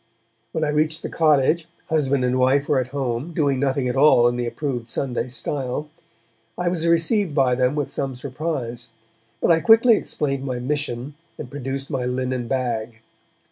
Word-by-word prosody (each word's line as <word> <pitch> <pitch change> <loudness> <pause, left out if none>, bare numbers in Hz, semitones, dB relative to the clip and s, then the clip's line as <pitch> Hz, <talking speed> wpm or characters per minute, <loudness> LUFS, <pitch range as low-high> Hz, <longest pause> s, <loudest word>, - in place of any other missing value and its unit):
When 160 - -2
I 150 - +1
reached 155 +2 0
the - - -3
cottage, 155 +1 +3 0.2
husband 140 -5 +1
and 125 +1 +1
wife 135 +3 +3
were 145 - +3
at 130 - -2
home, 135 +3 -3
doing 140 -4 +1
nothing 135 -1 0
at 125 - -1
all 135 -4 +6
in 120 - 0
the 120 0 -2
approved 125 -3 -4
Sunday 125 -2 -2
style. 135 +3 -4 0.7
I 175 -1 0
was 170 -2 -1
received 170 +1 +2
by 130 -3 +3
them 125 +2 +1
with 145 -2 -2
some 135 -2 -3
surprise, 125 -3 -4 0.5
but - - +3
I 165 - +5
quickly 225 +6 +6
explained 140 -7 -3
my 130 -2 -3
mission, 135 0 -3 0.2
and 125 - -8
produced 135 0 -5
my 130 -3 -1
linen 125 -1 -2
bag. 115 -3 -2
135 Hz, 175 wpm, -22 LUFS, 125-150 Hz, 0.7 s, all